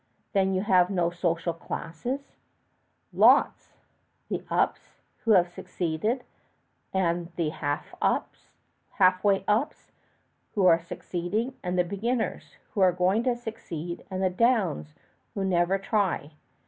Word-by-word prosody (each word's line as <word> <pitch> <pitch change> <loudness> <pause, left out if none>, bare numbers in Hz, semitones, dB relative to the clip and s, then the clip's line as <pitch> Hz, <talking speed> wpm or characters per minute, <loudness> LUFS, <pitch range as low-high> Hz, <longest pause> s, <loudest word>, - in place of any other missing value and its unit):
"Then 190 -1 +2
you 185 - 0
have 185 -4 +4
no 175 -3 +1
social 170 -1 -1
classes?" 205 - -5 0.8
"Lots. - - +4 0.6
The - - -3
ups, - - -1 0.2
who 225 - +3
have 180 -3 +5
succeeded; 180 - -2 0.7
and 175 -2 0
the 165 -3 0
half 145 -1 -3 1.3
way 200 -2 +3
ups, 215 +7 0 0.6
who 200 -3 +3
are 165 -2 +6
succeeding; 185 +9 -3
and 180 0 -2
the 180 - +4
beginners, 220 +7 -3 0.2
who 205 - 0
are 185 -1 +6
going 180 +5 +2
to 250 -2 +2
succeed; 175 -8 -6
and 190 0 -2
the 185 - +2
downs, 185 - +1 0.4
who 195 - -1
never 180 +1 +2
try. 195 -7 -1
185 Hz, 120 wpm, -27 LUFS, 170-210 Hz, 1.3 s, are